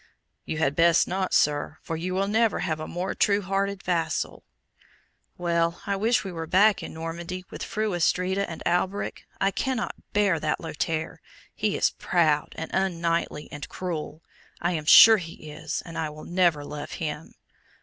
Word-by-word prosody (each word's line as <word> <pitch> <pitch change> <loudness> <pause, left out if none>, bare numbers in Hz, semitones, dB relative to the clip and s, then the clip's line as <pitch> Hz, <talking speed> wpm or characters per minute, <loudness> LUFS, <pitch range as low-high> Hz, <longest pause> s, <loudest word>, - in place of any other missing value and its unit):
"You 155 - -3
had 145 -3 +1
best 170 0 +4
not, 185 +1 -1
sir, 150 +1 +1
for 165 - -3
you 180 +3 -3
will 195 +1 +1
never 220 +1 +2
have 155 -1 -1
a 155 - -5
more 180 +2 -3
true 200 0 +2
hearted 195 +1 -1
vassal." 170 -2 -1 0.9
"Well, 170 -1 0
I 200 - 0
wish 225 +5 +2
we 195 - -5
were 165 -2 -5
back 200 +4 +4
in - - -7
Normandy, 170 +3 -5
with - - -8
Fru 215 -2 -2
Astrida 185 +3 +1
and 165 - -7
Alberic. 185 +3 -1
I 195 - +2
cannot 255 +4 -2 0.2
bear 200 -5 +2
that 155 0 -1
Lothaire. 160 0 -3 0.3
He - - -1
is - - +3
proud, 155 -4 +1
and 160 - -5
unknightly, 170 -5 -1
and 145 - -7
cruel. 165 -3 -5 0.4
I 175 - 0
am 155 -3 -3
sure 220 +7 +10
he 165 -4 -8
is, 155 +1 -4
and 165 -1 -6
I 160 -1 -1
will 150 0 -10
never 170 -5 +2
love 150 0 -7
him." 150 -1 -5
170 Hz, 170 wpm, -26 LUFS, 160-190 Hz, 0.9 s, sure